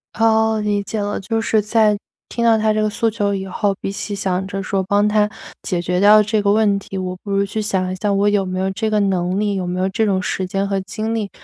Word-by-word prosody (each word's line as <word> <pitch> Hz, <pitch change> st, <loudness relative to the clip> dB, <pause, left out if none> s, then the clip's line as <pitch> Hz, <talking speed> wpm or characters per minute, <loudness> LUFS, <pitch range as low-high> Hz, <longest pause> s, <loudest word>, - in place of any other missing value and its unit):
哦， 220 Hz, 0 st, +3 dB
理 205 Hz, -1 st, 0 dB
解 215 Hz, +2 st, -4 dB
了。 205 Hz, 0 st, -2 dB
就 225 Hz, +3 st, -2 dB
是 220 Hz, -1 st, +2 dB
在 215 Hz, 0 st, +2 dB, 0.3 s
听 235 Hz, -, -2 dB
到 230 Hz, -1 st, +5 dB
他 215 Hz, 0 st, +2 dB
这 215 Hz, -, 0 dB
个 215 Hz, -, +1 dB
诉 225 Hz, +2 st, 0 dB
求 205 Hz, -2 st, -1 dB
以 190 Hz, 0 st, -4 dB
后， 195 Hz, +1 st, -1 dB
比 -, -, -3 dB
起 200 Hz, +1 st, -5 dB
想 190 Hz, -1 st, -1 dB
着 195 Hz, 0 st, -4 dB
说 195 Hz, 0 st, -1 dB
帮 205 Hz, +2 st, +2 dB
他 210 Hz, 0 st, +2 dB, 0.3 s
解 175 Hz, -2 st, -2 dB
决 180 Hz, +1 st, -1 dB
掉 210 Hz, +2 st, +7 dB
这 215 Hz, +1 st, 0 dB
个 200 Hz, 0 st, +2 dB
问 210 Hz, -1 st, +3 dB
题， 195 Hz, 0 st, -8 dB
我 185 Hz, -1 st, -3 dB
不 200 Hz, -, -6 dB
如 200 Hz, 0 st, +2 dB
去 215 Hz, +2 st, -3 dB
想 185 Hz, -3 st, -1 dB
一 -, -, -3 dB
下 205 Hz, +2 st, -1 dB
我 200 Hz, +1 st, +2 dB
有 205 Hz, -2 st, +2 dB
没 185 Hz, 0 st, -3 dB
有 190 Hz, +1 st, 0 dB
这 220 Hz, +3 st, -2 dB
个 215 Hz, -1 st, +1 dB
能 185 Hz, -1 st, 0 dB
力， 205 Hz, -1 st, 0 dB
有 185 Hz, -, -2 dB
没 180 Hz, +1 st, -3 dB
有 185 Hz, -, +1 dB
这 220 Hz, +3 st, 0 dB
种 190 Hz, -2 st, +1 dB
时 185 Hz, 0 st, -2 dB
间 195 Hz, +1 st, -1 dB
和 195 Hz, -1 st, -1 dB
精 220 Hz, +3 st, -4 dB
力 215 Hz, -3 st, -2 dB
205 Hz, 290 characters per minute, -19 LUFS, 190-215 Hz, 0.3 s, 掉